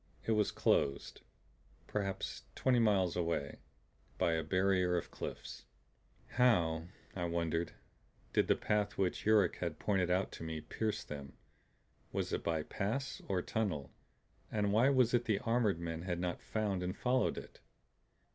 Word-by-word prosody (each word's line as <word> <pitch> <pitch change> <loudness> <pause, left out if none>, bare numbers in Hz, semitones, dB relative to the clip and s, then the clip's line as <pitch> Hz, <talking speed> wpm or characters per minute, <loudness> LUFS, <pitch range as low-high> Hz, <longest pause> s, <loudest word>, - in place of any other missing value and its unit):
It - - +1
was 105 -2 +3
closed, 70 0 +1 0.6
perhaps 100 -2 -3
twenty 125 -2 +3
miles 100 -6 +3
away, 85 -5 -1 0.6
by 85 - +2
a 80 - +1
barrier 90 +1 +2
of 85 - -4
cliffs. - - -7 0.6
How, 85 -10 +3 0.3
I 90 -2 -1
wondered, 85 -1 -1 0.6
did - - +3
the - - +4
path 105 -1 0
which 95 +1 0
Yuruk 105 -5 +4
had 85 -3 -3
pointed 95 -4 +1
out 90 +2 +1
to - - -8
me 80 -1 -3
pierce 110 +7 -2
them? 70 -2 -8 0.7
Was - - -2
it - - -1
by 80 -2 0
pass 130 - -3
or 90 -2 0
tunnel; 95 - -2 0.6
and 105 -2 +1
why 120 +5 +5
was 130 -4 +4
it 120 0 +3
the 110 -3 +2
armored 115 -4 +1
men 85 -1 -4
had 90 -1 -2
not 90 -1 -2
found 105 -4 -1
and 90 +2 -3
followed 130 +1 +1
it? - - -9
95 Hz, 150 wpm, -35 LUFS, 85-110 Hz, 0.7 s, why